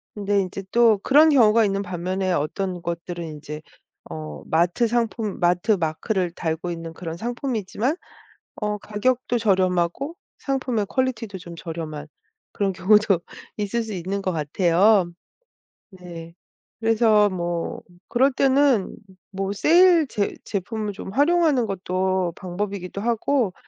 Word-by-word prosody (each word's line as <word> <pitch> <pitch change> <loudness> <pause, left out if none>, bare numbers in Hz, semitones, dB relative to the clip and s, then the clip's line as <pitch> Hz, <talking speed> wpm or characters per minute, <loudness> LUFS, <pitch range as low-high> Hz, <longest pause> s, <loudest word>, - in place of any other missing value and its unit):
근데 205 -1 +1
인제 190 +1 -5
또 230 -3 +5
그런 305 +4 +6
경우가 230 -5 +5
있는 200 -1 0
반면에 185 0 -2
어떤 175 +4 -2
것들은 170 0 -5
인제 150 -1 -8 0.5
어 75 -2 -7
마트 175 +8 +2
상품, 225 -3 -1
마트 180 +5 +2
마크를 175 +2 -1
달고 170 +1 -3
있는 165 -1 -6
그런 165 -1 -6
상품이지만 240 - -2 0.6
어 210 -1 -2
가격도 240 +4 -1
저렴하고 190 - +1 0.2
상품의 255 -6 -1
퀄리티도 230 -6 -2
좀 170 -1 -10
저렴한 160 -3 -6 0.5
그런 195 -2 0
경우도 195 0 +4 0.4
있을 210 +3 -1
수 220 - -6
있는 190 +3 -3
것 185 - -1
같아요. 175 +5 +3 0.8
네, 170 -3 -10 0.5
그래서 220 -2 +4
뭐 175 -2 -3 0.3
그럴 265 +3 +3
때는 270 -6 +3 0.4
뭐 195 0 -3
세일 335 - +5
제 205 -5 -1
제품을 210 +1 -3
좀 190 - -8
활용하는 295 - +3
것도 185 -1 -1
방법이기도 195 +1 -5
하고 235 -1 +1
195 Hz, 270 characters per minute, -23 LUFS, 175-230 Hz, 0.8 s, 그런